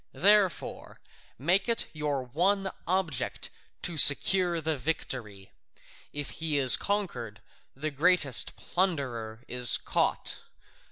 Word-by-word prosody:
Therefore 200 -1 0 0.4
make 180 - 0
it 230 - +1
your 150 -3 -3
one 190 +9 -1 0.2
object 165 -9 -2 0.3
to 165 -3 -1
secure 175 +4 +4
the 160 0 -3
victory; 120 -8 -5 0.6
if 145 -1 -6
he 160 -2 -2
is 130 -3 +8
conquered, 130 - -4 0.4
the 155 +3 -5
greatest 145 -3 +3
plunderer 130 - -3
is 125 -1 +4
caught. - - 0
155 Hz, 105 wpm, -27 LUFS, 130-185 Hz, 0.6 s, is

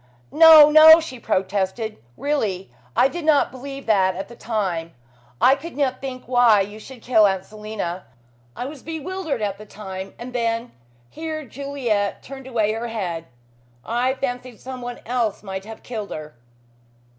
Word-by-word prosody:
"No, 310 -1 +9
no!" 315 +1 +10
she 260 -7 -7
protested. 195 +2 -2 0.2
"Really, 215 - -2 0.2
I 260 - +5
did 345 +4 -6
not 300 -4 +3
believe 275 +2 -8
that 190 -4 +3
at 195 +3 -6
the 240 - -11
time. 185 -9 -3 0.4
I 260 - +6
could 300 +3 -6
not 265 -3 0
think 260 -2 -6
why 240 -4 +5
you 205 +2 -5
should 245 +1 -12
kill 220 -4 +5
Aunt 190 -1 -2
Selina. 210 - -6 0.5
I 245 - -4
was 280 0 -8
bewildered 320 - -4
at 200 -1 -2
the 215 - -10
time 190 -2 -8
and 245 +1 -8
then 230 0 -1 0.2
" 120 0 -34
here 315 -1 -5
Juliet 245 -6 -2
turned 270 -1 -10
away 220 -4 +1
her 225 +2 -3
head, 180 -8 -4 0.6
"I 245 +3 0
fancied 250 -3 -5
someone 250 -2 -7
else 235 -4 -1
might 190 -1 -6
have 225 0 -10
killed 215 -4 -5
her." 155 0 -7
235 Hz, 160 wpm, -22 LUFS, 205-270 Hz, 0.6 s, no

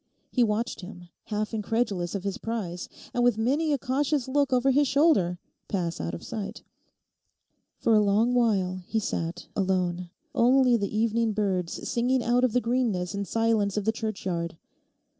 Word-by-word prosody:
He 250 - +3
watched 220 0 -1
him, 180 -2 -10 0.2
half 215 +1 -3
incredulous 210 -5 -1
of 195 - -3
his 200 -1 -3
prize, 195 -7 -4 0.2
and 245 - +1
with 245 -3 +3
many 285 +8 +1
a 285 - +2
cautious 270 +2 0
look 280 +1 +1
over 255 +1 +3
his 285 +2 +3
shoulder, 265 - +3 0.3
pass 175 -4 -2
out 85 0 -3
of - - -9
sight. 210 0 -6 1.1
For 230 - +2
a 215 - +6
long 210 +4 +3
while 195 -7 +1
he 225 - -1
sat 170 -4 -3
alone, 180 -2 0 0.2
only 255 -1 +4
the 200 -3 -1
evening 230 0 +1
birds 190 -4 -1
singing 245 +1 +1
out 245 +1 +2
of 250 -4 +2
the 250 - +3
greenness 230 -7 0
and 200 -1 -3
silence 225 -3 +1
of 205 - -1
the 220 - +3
churchyard. 190 -7 -3
220 Hz, 165 wpm, -27 LUFS, 190-245 Hz, 1.1 s, a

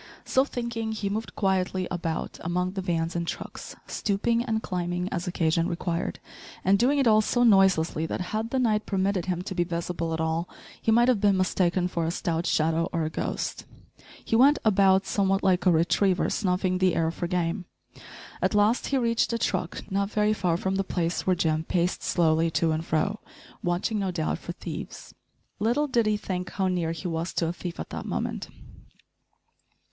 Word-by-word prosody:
So 260 - +3
thinking, 235 -4 -3
he 205 -2 -3
moved 220 +2 -4
quietly 185 -2 0
about 170 -3 -3
among 180 +2 -1
the 190 0 -4
vans 170 -1 -1
and 170 0 -2
trucks, - - -6
stooping 230 +3 0
and 220 -2 -1
climbing 180 0 -2
as 175 0 -3
occasion 165 -1 +1
required, 170 -1 -2 0.5
and 195 +1 +4
doing 265 +5 +3
it 275 - +3
all 215 -2 +6
so 245 +3 +1
noiselessly 190 -7 +4
that, - - -3
had 220 +1 -1
the 265 - -1
night 220 -4 +1
permitted 190 -2 0
him 180 -1 -1
to 190 - -5
be 175 -2 +1
visible 170 -1 -3
at 160 - -2
all, 160 +2 -1 0.3
he 225 - +2
might 240 +2 +5
have 245 -6 +3
been 200 -2 +4
mistaken 185 -1 +1
for 170 -2 -2
a - - +1
stout 170 0 -1
shadow 165 +2 +1
or 165 -2 -1
a 155 - -2
ghost. - - -3 0.6
He - - 0
went 275 +5 +6
about 195 -2 +4
somewhat 195 -1 +1
like 185 0 +2
a - - +7
retriever 175 +3 +2
snuffing 185 -2 0
the 185 -2 +3
air 165 0 +1
for 175 - -4
game. 175 +1 -1 0.8
At - - +1
last 210 +4 +3
he 275 - +1
reached 235 -2 +1
a - - +1
truck, 185 -5 -2
not 200 +1 0
very 210 0 +2
far 180 -5 0
from 190 +1 -1
the 195 - +1
place 175 -2 -2
where 185 - +4
Jim 160 -2 0
paced 175 +1 0
slowly 165 -1 +2
to 165 -1 +2
and 160 +1 -1
fro, 170 +6 0 0.4
watching, 175 +5 -1
no 195 -1 -1
doubt, 165 -3 -2
for - - -6
thieves. - - -8 0.5
Little 240 +8 +2
did 240 -6 +1
he 210 0 +2
think 185 -3 -4
how 190 -1 -1
near 175 -3 0
he 165 +3 -5
was 165 +1 -3
to 170 - 0
a - - -2
thief 175 -1 -7
at - - -6
that - - -5
moment! - - -3
185 Hz, 195 wpm, -26 LUFS, 170-210 Hz, 0.8 s, a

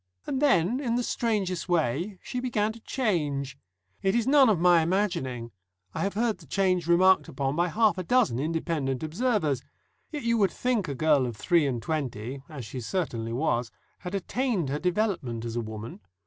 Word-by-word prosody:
And 270 - -2
then, 245 - +3
in 240 -5 -1
the 245 - 0
strangest 200 -8 -1
way, 170 - 0
she 250 - -4
began 220 -4 0
to 230 - -12
change. 150 - -1 0.5
It 195 +2 +1
is 235 -2 +2
none 270 -2 +6
of 200 -6 +2
my 175 -1 +5
imagining; 160 - -1 0.4
I - - -4
have 195 0 -1
heard 225 0 0
the - - -15
change 185 -4 +1
remarked 175 -2 +5
upon 135 +1 -2
by 175 +2 +2
half 215 +2 +2
a - - -2
dozen 165 - +2
independent 155 -3 -1
observers. 160 - 0 0.5
Yet 295 -4 -5
you 230 0 +2
would 195 -2 +4
think 240 -2 -1
a 140 - -3
girl 145 -3 +3
of 115 -3 -6
three 170 - +3
and 120 -4 -2
twenty 135 -4 -3
(as 140 -7 -7
she 125 +3 -6
certainly 115 - -2
was) 120 -2 0 0.3
had 180 +2 -5
attained 200 - -1
her 145 +2 -1
development 180 - -1
as 115 0 -4
a 120 - 0
woman. 110 0 -7
175 Hz, 185 wpm, -27 LUFS, 135-215 Hz, 0.5 s, none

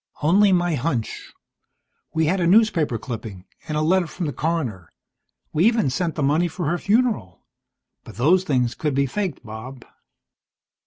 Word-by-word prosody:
"Only 195 +6 +5
my 175 -2 +2
hunch. 130 -5 -3 0.8
We 160 0 +1
had 185 +5 +1
a 170 - +1
newspaper 175 - +3
clipping, 110 -6 -7 0.2
and 155 - -2
a - - +1
letter 180 +2 +2
from 175 +2 -5
the 145 - -3
coroner. 130 - -2 0.6
We 160 +5 +3
even 225 - +2
sent 170 +2 -2
the 150 - -1
money 155 +5 +2
for 170 +1 -5
her 175 +2 -1
funeral. 210 - 0 0.6
But - - -12
those 170 - +3
things 125 -7 0
could 150 -1 -2
be 140 0 +2
faked, 180 - -4
Bob." 115 +4 -9
155 Hz, 160 wpm, -22 LUFS, 125-180 Hz, 0.8 s, Only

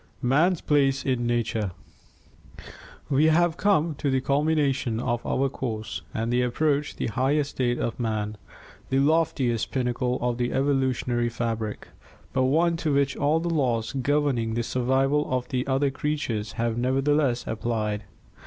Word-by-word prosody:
Man's 155 +8 +3
Place 140 -2 +2
in 125 -3 0
Nature 115 -5 -1 1.3
We 145 +2 +3
have 165 +1 +3
come 170 -5 +2
to 140 - 0
the 130 0 +2
culmination 140 -4 +1
of 120 0 -1
our 135 +1 +1
course 115 -5 -4
and 115 +2 -2
approach 140 +4 +1
the - - -3
high 130 +6 +1
estate 130 -4 0
of 120 - -3
man, 110 -2 -2 0.5
the 135 - +1
loftiest 140 -5 +1
pinnacle 125 -1 -1
of 120 0 -1
the 120 0 0
evolutionary 130 -3 +1
fabric, 115 -2 -3 0.4
but 130 -1 +2
one 165 +5 +2
to 160 -2 -1
which 140 0 +1
all 145 +3 +2
of 165 - -2
the 170 - -1
laws 120 -8 0
governing 135 -4 0
the 120 - 0
survival 135 +4 +1
of 125 -1 -1
the 130 -1 -2
other 135 +1 +1
creatures 130 -8 -2
have 115 0 -1
nevertheless 135 0 +1
applied. 110 -2 -2
130 Hz, 145 wpm, -25 LUFS, 120-145 Hz, 1.3 s, Man's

